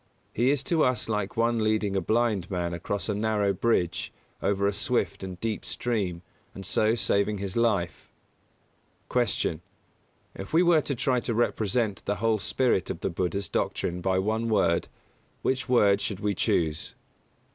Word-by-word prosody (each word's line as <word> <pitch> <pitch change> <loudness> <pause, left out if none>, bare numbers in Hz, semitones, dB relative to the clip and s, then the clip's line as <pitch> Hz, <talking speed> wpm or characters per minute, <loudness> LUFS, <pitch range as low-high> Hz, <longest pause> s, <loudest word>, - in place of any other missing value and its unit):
He 120 +4 +2
is 140 -1 +1
to 160 0 +2
us 125 -1 +1
like 105 -2 -2
one 115 0 +2
leading 110 -2 +1
a 95 - +1
blind 110 -2 +1
man 90 -3 -2
across 95 +4 -3
a 105 - 0
narrow 105 -1 +1
bridge 90 -4 0 0.3
over 100 0 +1
a 100 - +2
swift - - 0
and 95 -2 -6
deep 110 0 -2
stream 95 -8 -2 0.3
and 95 - -7
so 110 +5 +2
saving 105 -2 +1
his 100 -1 -4
life. 105 -7 0 1.0
170. - - 0 0.8
Q. - - -5
_If 100 - -13
we 170 +2 +5
were 170 -3 +5
to 140 - -3
try 125 +1 +1
to 115 -1 -2
represent 110 -3 0
the 105 - 0
whole 110 0 +1
spirit 120 -4 +1
of - - -4
the - - -1
Buddha's 95 +3 -2
doctrine 90 +2 -2
by 95 +1 +1
one 110 +4 0
word, 95 -6 +2 0.6
which 130 0 -1
word 105 -5 +4
should 100 -3 -3
we 105 -1 0
choose? 80 -4 0
105 Hz, 170 wpm, -27 LUFS, 95-115 Hz, 1.0 s, we